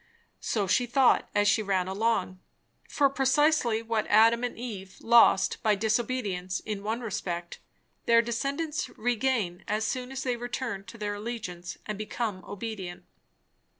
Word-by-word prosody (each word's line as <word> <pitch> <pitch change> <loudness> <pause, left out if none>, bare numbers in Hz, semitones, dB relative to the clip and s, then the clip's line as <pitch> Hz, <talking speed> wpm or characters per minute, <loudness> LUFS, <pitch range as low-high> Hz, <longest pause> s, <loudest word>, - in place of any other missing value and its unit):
So 210 -3 -1
she 245 +6 +2
thought 260 +1 +3
as 205 0 +3
she 215 +2 +4
ran 190 -3 0
along. 195 -2 0 0.5
For, 285 - +3
precisely 270 -3 +2
what 225 -1 -1
Adam 225 +3 +5
and 245 - -3
Eve 200 -6 -7
lost 230 -4 +5
by 215 -1 +3
disobedience, 215 -4 -1
in 210 -2 -5
one 220 +4 -2
respect, 175 -6 -4 0.5
their 230 0 +6
descendants 280 +7 -2
regain 230 -6 0
as 215 +1 0
soon 255 +2 -3
as 265 0 -4
they 250 -2 -1
return 240 -4 -4
to 230 - -11
their 210 -1 -3
allegiance 205 -5 -6
and 210 -1 -5
become 215 -3 -3
obedient. 200 -4 -6
220 Hz, 145 wpm, -28 LUFS, 200-245 Hz, 0.5 s, their